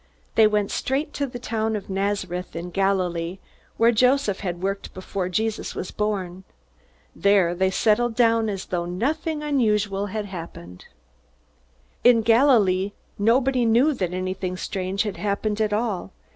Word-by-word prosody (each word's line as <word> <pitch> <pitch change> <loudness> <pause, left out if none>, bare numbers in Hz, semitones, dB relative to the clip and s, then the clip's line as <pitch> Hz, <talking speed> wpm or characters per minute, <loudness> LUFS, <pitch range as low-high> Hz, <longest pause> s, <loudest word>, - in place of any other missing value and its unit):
They 220 -1 +6
went 210 -1 0
straight 285 +3 -1
to 280 - -2
the 245 -1 -7
town 220 -2 -2
of 205 - -5
Nazareth 190 -3 -2
in 170 +2 -5
Galilee, 180 -2 0 0.4
where 230 +1 +5
Joseph 250 -3 +2
had 180 -2 -4
worked 195 +1 -3
before 185 0 -4
Jesus 220 +4 -2
was 180 - -5
born. 190 -3 -3 0.7
There 200 -4 +3
they 190 +2 +1
settled 225 +4 +2
down 230 -2 +3
as 195 -2 -4
though 175 -1 -2
nothing 295 - -2
unusual 210 -8 +1
had 210 +1 -4
happened. 165 - -9 1.2
In 235 -2 +6
Galilee 215 -5 +4 0.3
nobody 250 +4 +3
knew 240 +7 +4
that 185 -9 -2
anything 185 0 -3
strange 190 +2 -2
had 205 -3 -4
happened 210 +1 -1
at 215 -1 +1
all. 210 -3 -2
205 Hz, 145 wpm, -24 LUFS, 185-230 Hz, 1.2 s, They